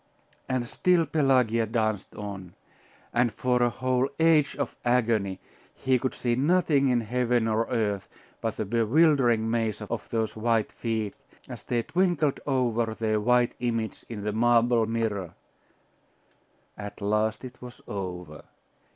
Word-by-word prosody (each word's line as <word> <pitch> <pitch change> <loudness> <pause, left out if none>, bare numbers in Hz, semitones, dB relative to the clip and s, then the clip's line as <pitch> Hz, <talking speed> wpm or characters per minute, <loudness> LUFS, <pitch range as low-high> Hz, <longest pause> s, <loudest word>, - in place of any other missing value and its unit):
And 130 -2 -1
still 175 +5 +2
Pelagia 125 -7 +2
danced 110 -3 -1
on; 100 -4 -7 0.6
and 120 -1 +2
for 125 +3 0
a 120 - +4
whole 130 +2 0
age 160 -3 +4
of 140 - -3
agony, 110 -6 +1 0.4
he 130 -1 +1
could 130 +1 -2
see 120 -1 0
nothing 145 0 +3
in 120 -2 +2
heaven 120 0 0
or 110 +1 +1
earth 105 -5 -1 0.3
but 115 -2 -2
the 110 - -2
bewildering 120 +1 +3
maze 115 -3 -1
of - - -5
those 110 -2 -1
white 110 -1 +1
feet, 110 -3 -3 0.3
as - - -8
they 120 -1 -1
twinkled 175 -4 +1
over 120 -4 0
their 110 -1 0
white 125 +2 +3
image 115 -2 -2
in 105 -3 -6
the 105 0 -2
marble 120 0 +3
mirror.... 110 -6 -2 1.4
At 105 -1 -8
last 105 +3 0
it 125 0 -11
was 125 0 -10
over. 90 -5 -6
115 Hz, 140 wpm, -27 LUFS, 110-125 Hz, 1.4 s, a